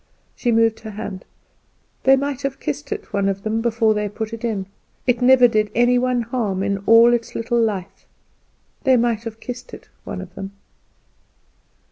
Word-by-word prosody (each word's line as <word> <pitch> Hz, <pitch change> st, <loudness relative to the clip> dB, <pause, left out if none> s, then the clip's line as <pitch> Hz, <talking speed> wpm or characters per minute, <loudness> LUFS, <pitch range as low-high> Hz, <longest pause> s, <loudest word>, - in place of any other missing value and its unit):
She 240 Hz, -, 0 dB
moved 225 Hz, -1 st, +3 dB
her 220 Hz, -, -8 dB
hand. 205 Hz, -3 st, -7 dB, 0.8 s
"They 270 Hz, +1 st, +7 dB
might 280 Hz, 0 st, -2 dB
have 275 Hz, -1 st, -3 dB
kissed 145 Hz, 0 st, -4 dB
it, -, -, -5 dB
one 200 Hz, 0 st, +1 dB
of 195 Hz, 0 st, -3 dB
them, 220 Hz, +1 st, -1 dB
before 225 Hz, -1 st, +2 dB
they 210 Hz, -1 st, -2 dB
put 220 Hz, +2 st, -5 dB
it 230 Hz, +1 st, -7 dB
in. 215 Hz, -5 st, -2 dB, 0.4 s
It 250 Hz, -1 st, +1 dB
never 250 Hz, 0 st, +7 dB
did 215 Hz, -2 st, +1 dB
any 245 Hz, +1 st, +4 dB
one 250 Hz, -1 st, 0 dB
any -, -, -12 dB
harm 215 Hz, -6 st, -2 dB
in 200 Hz, 0 st, -1 dB
all 230 Hz, +1 st, +7 dB
its 235 Hz, -1 st, -2 dB
little 235 Hz, +1 st, 0 dB
life. 195 Hz, -4 st, -3 dB, 0.8 s
They 260 Hz, -3 st, +5 dB
might 235 Hz, -1 st, 0 dB
have 225 Hz, -1 st, -7 dB
kissed 250 Hz, +1 st, -8 dB
it, -, -, -16 dB
one -, -, -6 dB
of 185 Hz, -1 st, -9 dB
them." 195 Hz, +1 st, -7 dB
225 Hz, 185 wpm, -21 LUFS, 205-245 Hz, 0.8 s, They